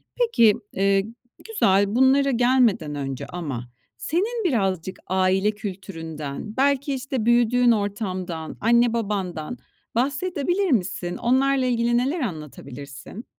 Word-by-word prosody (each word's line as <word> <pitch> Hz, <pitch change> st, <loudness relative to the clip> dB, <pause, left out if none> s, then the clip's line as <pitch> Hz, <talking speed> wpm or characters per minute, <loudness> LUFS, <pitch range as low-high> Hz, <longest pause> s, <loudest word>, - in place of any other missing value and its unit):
Peki, 455 Hz, -, +4 dB, 0.2 s
eee, 195 Hz, 0 st, +2 dB, 0.4 s
güzel. 200 Hz, -, +2 dB
Bunlara 270 Hz, +2 st, +4 dB
gelmeden 240 Hz, -, +2 dB
önce 135 Hz, -2 st, -4 dB
ama 140 Hz, -9 st, -5 dB, 0.3 s
senin 440 Hz, +8 st, -1 dB
birazcık 190 Hz, -, -1 dB
aile 190 Hz, +2 st, +2 dB
kültüründen 185 Hz, -4 st, -7 dB
belki, 280 Hz, +1 st, +2 dB
işte, 260 Hz, -3 st, -3 dB
büyüdüğün 240 Hz, +1 st, +4 dB
ortamdan, 185 Hz, -6 st, -3 dB
anne 235 Hz, +1 st, +4 dB
babandan 195 Hz, -4 st, -3 dB, 0.4 s
bahsedebilir 335 Hz, +7 st, 0 dB
misin? 180 Hz, -5 st, -1 dB
Onlarla 265 Hz, +2 st, +2 dB
ilgili 240 Hz, -1 st, +1 dB
neler 270 Hz, +8 st, 0 dB
anlatabilirsin? 150 Hz, -, -7 dB
220 Hz, 105 wpm, -23 LUFS, 185-260 Hz, 0.4 s, Peki